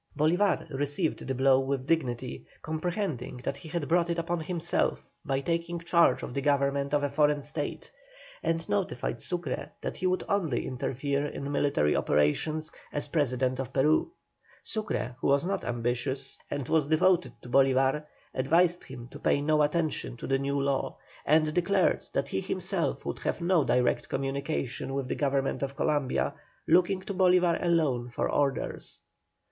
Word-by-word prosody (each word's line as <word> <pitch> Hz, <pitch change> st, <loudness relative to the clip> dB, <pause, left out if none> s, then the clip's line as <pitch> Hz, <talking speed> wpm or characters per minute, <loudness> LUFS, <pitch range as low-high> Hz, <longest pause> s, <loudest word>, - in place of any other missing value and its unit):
Bolívar 175 Hz, +6 st, +2 dB
received 145 Hz, +4 st, -1 dB
the 135 Hz, -, -1 dB
blow 135 Hz, +1 st, +5 dB
with 135 Hz, -1 st, -2 dB
dignity, 130 Hz, -6 st, -1 dB, 0.2 s
comprehending 160 Hz, -, -3 dB
that 140 Hz, -, -2 dB
he 160 Hz, -, -10 dB
had 165 Hz, -2 st, -2 dB
brought 170 Hz, 0 st, +2 dB
it 170 Hz, -, 0 dB
upon 170 Hz, +1 st, -1 dB
himself 170 Hz, +1 st, -1 dB, 0.2 s
by 135 Hz, -4 st, -1 dB
taking 170 Hz, +2 st, -1 dB
charge 170 Hz, -4 st, +3 dB
of -, -, -5 dB
the 140 Hz, -, -1 dB
government 140 Hz, 0 st, +1 dB
of 145 Hz, -, +1 dB
a 145 Hz, -, +1 dB
foreign 145 Hz, 0 st, +2 dB
state, 145 Hz, -, -5 dB, 0.5 s
and 165 Hz, 0 st, -1 dB
notified 175 Hz, -, -1 dB
Sucre 175 Hz, -7 st, -3 dB
that -, -, -5 dB
he 185 Hz, -, 0 dB
would 185 Hz, 0 st, +1 dB
only 165 Hz, -12 st, 0 dB
interfere 140 Hz, +2 st, -1 dB
in 140 Hz, 0 st, -5 dB
military 140 Hz, -, +2 dB
operations 155 Hz, -, +1 dB, 0.2 s
as 145 Hz, -, -1 dB
President 130 Hz, -4 st, +1 dB
of 130 Hz, -1 st, -3 dB
Peru. 150 Hz, -, +2 dB, 0.5 s
Sucre, 210 Hz, -, -2 dB
who -, -, +1 dB
was 140 Hz, +3 st, +3 dB
not 195 Hz, +1 st, -1 dB
ambitious, 120 Hz, +3 st, -2 dB
and 140 Hz, -3 st, -3 dB
was 155 Hz, -3 st, +2 dB
devoted 160 Hz, -4 st, +3 dB
to -, -, -9 dB
Bolívar, 135 Hz, +2 st, +3 dB, 0.3 s
advised 170 Hz, +6 st, +2 dB
him 120 Hz, 0 st, -9 dB
to -, -, -10 dB
pay -, -, +2 dB
no 150 Hz, +1 st, +2 dB
attention 150 Hz, -4 st, 0 dB
to -, -, -7 dB
the 135 Hz, 0 st, +1 dB
new 140 Hz, +1 st, -1 dB
law, 140 Hz, -1 st, -1 dB, 0.3 s
and 155 Hz, +1 st, +4 dB
declared 180 Hz, +4 st, +2 dB
that -, -, -1 dB
he -, -, -1 dB
himself -, -, -2 dB
would -, -, -3 dB
have -, -, -2 dB
no 170 Hz, -2 st, +3 dB
direct 125 Hz, -2 st, +1 dB
communication 135 Hz, -1 st, -2 dB
with 135 Hz, -2 st, -2 dB
the -, -, -1 dB
Government 135 Hz, -1 st, 0 dB
of 140 Hz, 0 st, -3 dB
Columbia, 145 Hz, -2 st, 0 dB, 0.3 s
looking 180 Hz, +3 st, +4 dB
to 200 Hz, -, -4 dB
Bolívar 180 Hz, -2 st, +3 dB
alone 150 Hz, -8 st, +1 dB
for 120 Hz, -, -1 dB
orders. 140 Hz, -2 st, -1 dB
145 Hz, 165 wpm, -29 LUFS, 135-170 Hz, 0.5 s, blow